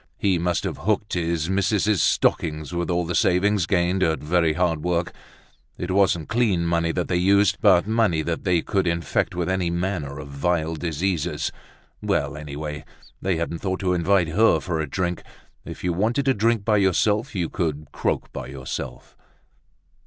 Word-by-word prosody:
He 95 -3 +1
must 85 0 0
have - - -4
hooked 105 +1 -1
his 85 -2 -1
missus's 100 +1 +1
stocking 75 -1 +1
with 85 +1 -2
all 90 0 0
the 90 - -3
savings 90 +1 +2
gained 90 +2 +1
at 80 -3 +2
very 80 +1 +1
hard 80 -2 0
work. 85 -1 -1 0.6
It 90 +1 -4
wasn't 95 -5 +2
clean 105 -8 +1
money 85 0 +1
they 90 - -1
had 90 -1 0
used, 100 +1 +3
but 95 -5 +5
money 110 -8 +1
that 85 0 -3 0.2
could 95 -3 0
infect 85 0 0
them - - -11
with 85 - -1
any 95 -2 0
manner 85 -5 -2
of 75 -1 -7
vile 80 +3 -1
diseases. 85 +1 -2 0.5
Well, - - 0
anyway, 75 0 -6 0.4
they 95 -1 0
hadn't 85 0 -3
thought 95 -2 -2
to 90 -1 +1
invite 90 0 +2
her 95 -1 +4
for 80 0 -3
a 80 -3 -3
drink. 90 +2 -2 0.4
If - - -9
you 90 -1 0
wanted 115 +9 0
to 135 - +4
drink 115 -1 +1
by 110 -2 +3
yourself, 105 - +1
you 90 -3 0
could 75 -4 -3
croak - - -2
by - - -6
yourself. 65 -1 -7
90 Hz, 175 wpm, -23 LUFS, 80-95 Hz, 0.6 s, but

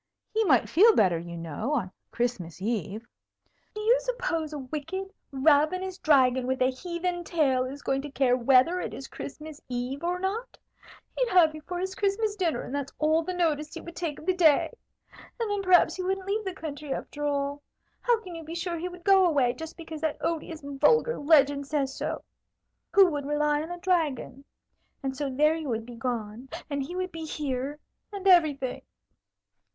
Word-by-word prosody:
He 445 +1 +2
might 265 - +4
feel 430 +7 +6
better, 180 -5 +3
you 170 0 -7
know, 170 - -3
on 190 -9 -2 0.2
Christmas 190 -10 -3
Eve." 215 +1 -3 0.7
"Do 425 - -4
you 460 +4 +4
suppose 370 -11 -2
a 300 - -5
wicked, 310 +9 -5 0.2
ravenous 310 +7 +2
dragon 260 -5 +4
with 260 0 0
a 255 +1 +3
heathen 350 +5 -3
tail 275 -7 +1
is 275 +2 -7
going 270 0 0
to 290 - -7
care 265 -3 +2
whether 260 +8 +4
it - - -5
is 270 - -8
Christmas 300 +1 -9
Eve 250 +4 -3
or 355 +1 0
not? 410 +7 -3 0.6
He'd - - +1
have 345 -5 +5
you 310 - -8
for 355 +3 -5
his 375 +1 -3
Christmas 410 +2 0
dinner, 355 -6 0
and - - -8
that's 280 -1 -3
all 315 +1 +3
the 365 +2 -4
notice 305 -4 0
he - - -6
would 340 0 -10
take 330 -5 -3
of - - -11
the 370 - +3
day. 320 -6 +4 0.7
And 455 -3 -1
then 410 -1 0
perhaps 370 -2 +5
he - - -2
wouldn't 380 +1 -2
leave 415 +2 -1
the 380 -1 -4
country, 300 -3 -6
after 295 +2 -4
all. 285 0 -1 0.4
How 480 -2 +3
can 365 -5 -9
you 330 -1 -7
be 320 +2 -7
sure 345 -1 -3
he 360 +2 -3
would 355 -1 -12
go 385 -1 +6
away, 270 -7 +2
just 320 +3 -8
because 320 -2 -8
that 315 -2 -1
odious, 325 -1 -3
vulgar 300 - +2
legend 285 -2 +4
says 280 -2 -1
so? - - -3 0.7
Who 395 -1 +8
would 285 -2 -3
rely 295 0 +1
on 320 - -6
a 350 - -5
dragon? 320 -7 -1 0.6
And 265 -1 -2
so 285 0 -2
there 300 +4 +3
you 320 -3 -4
would 225 -1 -2
be 245 - -10
gone, 230 0 -4 0.2
and 280 -1 -1
he 295 +7 -5
would 370 0 -2
be 325 -1 -6
here, 285 -2 -3 0.3
and 395 -1 -4
everything!" 300 -8 +4
305 Hz, 195 wpm, -27 LUFS, 270-360 Hz, 0.7 s, Who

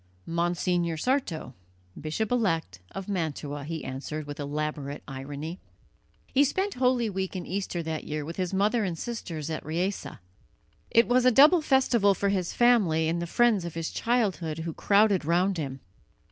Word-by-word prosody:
"Monsignor 170 0 0
Sarto, 185 - -1 0.4
Bishop 160 +9 -3
elect 165 - 0
of 195 -1 -7
Mantua," 150 -6 -3
he 160 0 -5
answered 145 +3 -5
with 145 0 -7
elaborate 145 0 -3
irony. 145 +5 -6 0.7
He 275 - +3
spent 380 +8 0
Holy 250 -2 +2
Week 190 -2 -3
and 180 -2 -4
Easter 185 -2 -3
that 160 -1 -3
year 150 -1 -4
with 165 +2 -7
his 185 -2 -1
mother 210 +4 +2
and 175 -4 -2
sisters 165 -9 -5
at 155 - -4
Riese. 175 +6 -2 0.8
It 230 - +4
was 250 +1 +3
a 255 - +7
double 305 +8 +7
festival 245 -8 +3
for 200 - 0
his 185 -3 0
family 200 -10 +3
and 170 +1 0
the 170 - -3
friends 225 -1 +3
of 170 -2 -6
his 165 -1 -3
childhood 195 -10 0
who 165 - -3
crowded 200 -1 +3
round 175 +3 +1
him. 135 -3 -5
175 Hz, 160 wpm, -27 LUFS, 155-220 Hz, 0.8 s, a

